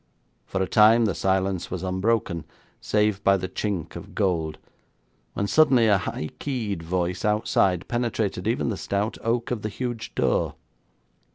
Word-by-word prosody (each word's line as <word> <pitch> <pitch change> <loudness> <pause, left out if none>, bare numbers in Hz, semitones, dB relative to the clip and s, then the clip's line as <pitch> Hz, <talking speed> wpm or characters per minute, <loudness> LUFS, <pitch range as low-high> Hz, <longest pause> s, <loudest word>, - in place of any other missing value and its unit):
For 95 0 -1
a - - -2
time 110 +3 +6
the 100 - +1
silence 95 -1 0
was 90 -1 -4
unbroken, 95 -3 0 0.3
save 105 -1 +1
by 100 0 +5
the 95 - -4
chink 95 -4 -3
of - - -9
gold, 85 -6 0 0.8
when 100 - 0
suddenly 130 -1 +4
a 105 -3 +4
high 75 -3 -4
keyed 115 - -3
voice 90 +2 -2
outside 105 -4 +1
penetrated 115 -5 -1
even 115 +1 0
the 105 - -2
stout 100 +3 -2
oak 115 +1 0
of 120 -4 -2
the 110 - -3
huge 120 0 -5
door. - - +1
100 Hz, 155 wpm, -25 LUFS, 95-115 Hz, 0.8 s, time